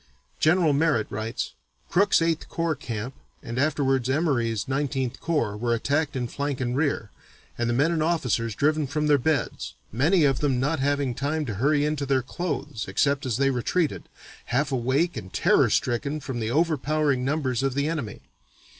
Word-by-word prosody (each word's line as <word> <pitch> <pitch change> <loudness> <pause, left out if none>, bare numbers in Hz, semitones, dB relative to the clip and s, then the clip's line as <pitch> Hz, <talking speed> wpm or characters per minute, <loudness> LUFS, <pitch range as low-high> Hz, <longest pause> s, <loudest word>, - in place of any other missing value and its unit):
General 160 -1 +4
Merritt 145 -6 +2
writes: 110 +3 -3 0.3
"Crook's 195 -1 +3
(Eighth 165 -1 -1
Corps) 165 -1 0
camp 120 -2 -5 0.3
and 120 +2 -4
afterwards 135 -3 +1
Emory's 130 -8 0
(Nineteenth 135 -2 -1
Corps) 150 -11 0
were 120 +2 0
attacked 145 +5 0
in 125 -2 -1
flank 140 +2 -3
and 125 -1 -1
rear, 140 -7 -1 0.4
and 120 0 -1
the - - +1
men 145 +6 +3
and 165 -2 0
officers 125 -9 0
driven 150 +2 +1
from 150 +3 -1
their 145 -1 +4
beds, 145 0 -1 0.2
many 155 - +3
of 135 -4 +3
them 135 -4 +1
not 145 +4 0
having 140 -2 0
time 145 +4 -2
to 115 - -3
hurry 145 +8 +2
into 150 -2 -1
their 130 -2 +2
clothes, 145 -4 -4
except 140 +8 +1
as 115 -3 0
they 135 0 +2
retreated, 145 +6 -1 0.4
half 135 +3 0
awake 135 +7 +1
and 95 -4 -8
terror - - +4
stricken 140 +5 0
from 130 -4 -5
the 110 -1 -2
overpowering 150 -2 +1
numbers 135 -3 0
of 135 -1 -1
the 140 +1 +1
enemy. 145 -10 -4
140 Hz, 170 wpm, -25 LUFS, 125-155 Hz, 0.4 s, General